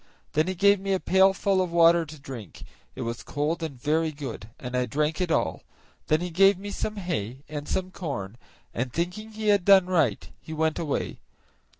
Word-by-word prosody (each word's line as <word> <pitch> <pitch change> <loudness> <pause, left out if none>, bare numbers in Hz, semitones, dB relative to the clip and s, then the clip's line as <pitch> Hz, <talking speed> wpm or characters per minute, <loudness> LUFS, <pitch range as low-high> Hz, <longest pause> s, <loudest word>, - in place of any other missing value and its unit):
Then 155 +3 +2
he 185 - -2
gave 200 +2 +4
me 195 0 -1
a 190 - +1
pailful 190 +1 +3
of 180 -2 -2
water 170 -1 +5
to 155 +1 -10
drink; 130 -8 -9 0.3
it 130 - -4
was 115 0 -4
cold 155 +4 -2
and 145 -6 -5
very 155 +4 +1
good, 135 -7 -7
and 125 -1 -5
I 125 0 +1
drank 150 +6 -1
it 180 - 0
all; - - 0 0.5
then 155 +2 +2
he 180 0 -3
gave 195 +3 +5
me 205 +2 -7
some 215 +1 -3
hay 140 - -4
and 150 -1 -6
some 185 0 -2
corn, 120 - -5 0.4
and 125 +1 -2
thinking 180 - -3
he 215 0 -1
had 200 -3 +4
done 195 -1 +7
right, 145 - +1
he 160 - -8
went 160 0 0
away. 155 -4 -2
160 Hz, 200 wpm, -26 LUFS, 140-185 Hz, 0.5 s, done